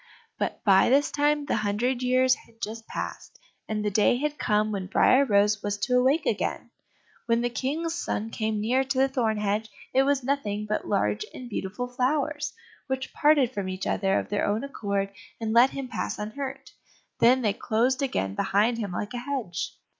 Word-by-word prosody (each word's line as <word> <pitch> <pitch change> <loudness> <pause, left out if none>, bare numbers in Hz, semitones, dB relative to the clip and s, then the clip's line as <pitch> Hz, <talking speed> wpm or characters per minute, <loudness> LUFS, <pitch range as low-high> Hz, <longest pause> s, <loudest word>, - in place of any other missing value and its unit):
But - - -3
by 195 -3 +5
this 280 +3 +3
time 295 0 +1
the - - 0
hundred 235 +5 0
years 255 +1 +4
had 230 - -10
just 225 0 -6
passed, - - -6 0.3
and 210 -1 -2
the 210 - +1
day 215 +4 +3
had 300 +2 -2
come 210 0 +1
when 195 -3 -3
Briar 260 +7 +4
rose 210 -2 +3
was 205 0 -2
to 250 +5 0
awake 265 +6 +3
again. - - -2 0.6
When 230 0 +2
the 240 0 -1
King's 310 +7 -2
son 225 -9 -3
came 220 -1 -1
near 245 +5 +2
to 265 0 -3
the 265 +1 +4
thorn 235 -5 0
hedge, 210 +1 -1 0.2
it 265 - +5
was 275 -1 +1
nothing 215 -6 -1
but 210 - -2
large 105 - +1
and 255 - -8
beautiful 210 +2 -4
flowers, 290 +4 -1 0.4
which 265 0 -3
parted 290 -5 +4
from 195 -2 -3
each 185 +1 -4
other 195 0 +1
of - - -3
their 205 0 0
own 210 +4 0
accord, 200 -7 -2 0.3
and 220 -1 -2
let 240 +3 +7
him 275 -1 -5
pass - - -3
unhurt, 265 +6 -6 0.5
then 255 +2 +5
they 210 -3 +2
closed 245 +6 0
again 95 - -1
behind 215 - +1
him 205 -4 -3
like 205 +5 -4
a 245 - -3
hedge. 245 -9 -4
235 Hz, 190 wpm, -26 LUFS, 210-265 Hz, 0.6 s, let